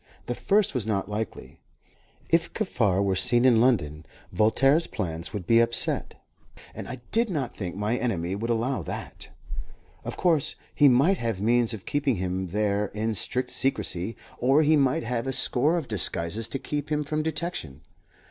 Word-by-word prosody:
The 120 - -2
first 200 - +1
was 120 -5 -2
not 100 -2 -1
likely. 110 +2 -5 0.7
If 165 0 +1
Kaffar 105 - 0
were 95 -1 +1
seen 120 +6 +3
in 120 -3 +5
London, 80 - +1 0.3
Voltaire's 135 +9 +3
plans 80 -1 -4
would 100 -4 -5
be 115 +3 +4
upset, 115 0 +2 0.6
and - - -7
I 125 0 -7
did 230 0 +2
not 140 -9 -3
think 90 -3 -5
my 105 +4 -1
enemy 95 -8 -2
would 115 +4 -4
allow 120 +3 0
that. - - -7 0.7
Of - - -6
course 165 -6 +2 0.2
he 145 - +5
might 140 +10 +4
have 115 -5 -2
means 120 +2 +2
of 110 -5 -6
keeping 140 -3 0
him 95 0 -3
there 105 +2 0
in 110 +1 -1
strict 125 +5 -1
secrecy, 105 -5 0 0.2
or 135 +5 +4
he 155 +1 +4
might 135 -4 +2
have 120 +2 -2
a - - 0
score 135 +5 +2
of 160 -6 -4
disguises 100 +1 -1
to - - -2
keep 145 +2 -5
him 150 0 +1
from 155 +1 -2
detection. 155 - -4
120 Hz, 170 wpm, -26 LUFS, 105-140 Hz, 0.7 s, in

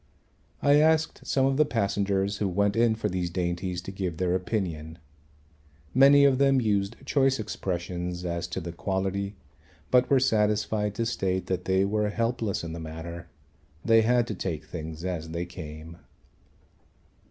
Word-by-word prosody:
I 145 +1 +6
asked 160 +1 +2
some 135 -1 +2
of 135 0 +1
the 155 - +6
passengers 100 -5 0
who 100 - 0
went 100 +2 +1
in 115 -1 +3
for 110 - -2
these 90 -1 -2
dainties 90 0 -2
to 95 - -6
give 95 -4 -4
their 90 0 0
opinion. 90 -5 -3 1.0
Many 140 +2 +7
of 135 -2 +3
them 135 -1 +4
used 105 -2 0
choice 135 -2 +2
expressions 90 -3 -4
as 85 -1 -2
to - - -4
the 85 +1 -6
quality 95 +3 -2 0.6
but 125 0 +4
were 135 - +5
satisfied 105 -3 +1
to 115 - -1
state 95 -5 -1
that 90 -1 -3
they 95 +1 +2
were 105 +1 0
helpless 115 -2 -1
in 80 -1 -5
the 85 - -6
matter; 80 +2 -7 0.6
they 115 -1 +6
had 120 +1 +3
to 115 - -4
take 85 -5 -4
things 80 +1 -7
as 85 -3 -3
they 85 +2 -3
came. 80 -2 -9
95 Hz, 160 wpm, -27 LUFS, 85-115 Hz, 1.0 s, Many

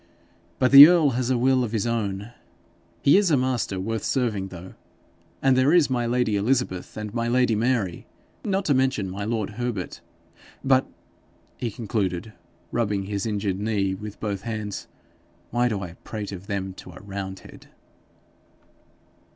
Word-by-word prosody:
But 130 - +2
the 140 +2 +13
earl 165 -5 +4
has 125 0 -1
a 130 - +2
will 130 +1 +3
of 115 -2 -4
his 110 -2 0
own. 105 -2 -2 0.7
He 140 - +6
is 200 -3 +3
a 150 - +4
master 125 -7 -1
worth 110 +2 -3
serving 110 -7 -1
though. 90 0 -10 0.7
And 135 -1 +4
there 130 +3 +4
is 165 -6 +4
my 120 -2 0
lady 120 -3 +1
Elizabeth 110 -4 -1
and 105 -1 -5
my 115 -1 -1
lady 125 -1 +2
Mary 110 -5 -1 0.4
not 195 -1 -1
to 145 - +3
mention 130 -8 0
my 100 +2 -4
lord 110 -2 -2
Herbert! 115 -7 -4 0.6
But,' 130 -1 +3 0.7
he 120 - -2
concluded, 105 -2 -3 0.4
rubbing 105 -4 0
his 100 +2 -3
injured 100 -3 -2
knee 100 -3 0
with 105 +2 -8
both 100 -3 -3
hands, 110 -2 -5 0.6
'why 120 +1 +2
do 105 -4 -2
I 90 -3 -7
prate 105 -2 -6
of 95 0 -9
them 95 -2 -3
to 90 - -11
a - - -11
roundhead?' 95 -2 -8
110 Hz, 160 wpm, -24 LUFS, 100-125 Hz, 0.7 s, the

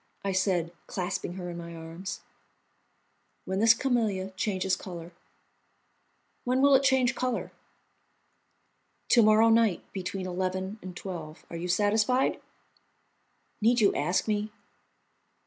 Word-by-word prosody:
I 195 - +1
said, 185 -3 +1 0.2
clasping 180 -1 -3
her 180 -1 -6
in 170 - -7
my 170 0 -8
arms. 165 +4 -7 1.2
"When 190 +1 -2
this 225 +1 +6
camellia 220 -7 0
changes 190 -1 -1
colour." 175 -2 -8 1.3
"When 250 +1 +1
will 280 +1 +5
it 270 - +6
change 265 -2 +3
colour?" 255 -2 -2 1.6
"To 240 - +6
morrow 215 +1 +5
night 225 -4 +3
between 190 0 -4
eleven 185 +3 -3
and 180 -1 -8
twelve. 165 -5 -7
Are - - -6
you 170 +2 -4
satisfied?" 210 +7 +2 1.2
"Need 235 +3 +4
you 205 -3 +4
ask 175 +9 0
me?" 210 0 0
195 Hz, 120 wpm, -28 LUFS, 180-225 Hz, 1.6 s, this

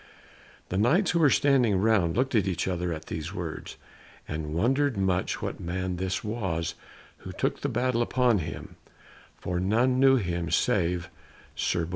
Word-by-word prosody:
The 95 - -1
Knights 160 - +3
who 170 - +1
were 155 -3 +5
standing 130 -8 +3
round 100 -5 +2
looked 130 +2 +1
at 105 -5 +2
each 90 -1 -1
other 90 -1 -1
at 80 -1 -5
these 80 -2 -5
words, - - -6 0.5
and 75 0 -4
wondered 135 - +1
much 95 -1 0
what - - -4
man 90 +1 -3
this 95 0 -2
was 95 -7 -2 0.4
who - - -9
took - - -2
the 140 - -1
battle 120 0 0
upon 120 -2 +2
him, 75 - -7 0.6
for 90 0 -3
none 120 +7 +2
knew 135 0 +6
him 85 -7 -1
save 85 +3 +1 0.4
Sir 85 - 0
Bors. - - -10
95 Hz, 165 wpm, -27 LUFS, 85-125 Hz, 0.6 s, knew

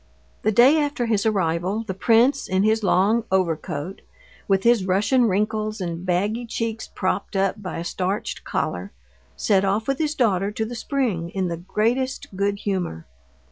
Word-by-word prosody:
The 215 - +2
day 255 +8 +6
after 285 -4 -1
his 220 -2 +1
arrival 190 +1 0
the 190 - -3
prince, 235 +7 +3
in 190 +1 +1
his 220 +1 +2
long 205 +4 +3
overcoat, 170 -2 -1 0.5
with 195 -1 +2
his 235 -4 +4
Russian 210 +7 +3
wrinkles 215 +2 -1
and 170 -2 -4
baggy 205 +6 -1
cheeks 225 -1 -3
propped 195 +2 -2
up 195 +2 0
by 185 - -5
a 165 - -3
starched 185 +3 -3
collar, 90 +3 -3 0.4
set 195 -3 +2
off 200 +3 0
with 275 0 0
his 305 -1 0
daughter 200 -7 +2
to 220 - -2
the 235 - -6
spring 230 - -1
in 185 -1 -2
the 170 - -3
greatest 230 +6 -1
good 200 +1 0
humor. 180 - -3
205 Hz, 165 wpm, -23 LUFS, 185-230 Hz, 0.5 s, day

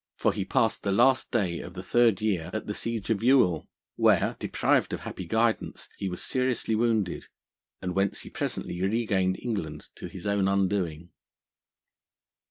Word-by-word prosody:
For 110 - +1
he 100 -2 -3
passed 110 +2 +1
the 100 - -1
last 130 +6 +4
day 95 -8 0
of 90 - -9
the 90 - -6
third 115 0 +3
year 95 -6 0
at 110 - -3
the 105 - -3
siege 115 -1 -3
of 105 - +1
Youghal, 115 - +4 0.3
where; - - +3
deprived - - +1
of - - -3
happy 95 - -6
guidance, 115 +3 0
he 95 - -3
was 90 - -5
seriously 125 -3 0
wounded, 110 -5 0 0.6
and 90 -1 -2
whence 95 +1 0
he - - -10
presently 90 - -3
regained 95 -2 +1
England 80 -11 -4
to - - -6
his 95 0 -9
own 100 -1 +2
undoing. 95 -4 0
100 Hz, 165 wpm, -27 LUFS, 90-115 Hz, 0.6 s, last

